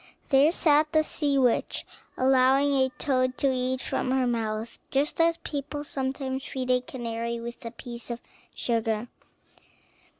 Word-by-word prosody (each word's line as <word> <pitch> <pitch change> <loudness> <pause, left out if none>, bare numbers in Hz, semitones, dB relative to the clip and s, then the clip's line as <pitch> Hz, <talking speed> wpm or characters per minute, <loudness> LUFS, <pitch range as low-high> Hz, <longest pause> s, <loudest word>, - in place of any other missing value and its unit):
There 280 +3 +6
sat 305 -3 +3
the 310 0 +5
sea 290 -2 0
witch, 250 -3 +1 0.3
allowing 265 +2 +4
a 260 -1 +3
toad 255 -2 +1
to 275 -2 +2
eat 255 0 -1
from - - -2
her 260 0 +2
mouth, 225 -1 -2
just 285 +4 +1
as 335 0 +4
people 290 -2 -5
sometimes 265 -1 -3
feed 255 -3 -3
a 250 0 +3
canary 235 -2 -4
with 235 +1 -7
a - - -3
piece 240 +1 -9
of 235 0 -4 0.4
sugar. 225 -1 -1
260 Hz, 145 wpm, -27 LUFS, 240-280 Hz, 0.4 s, There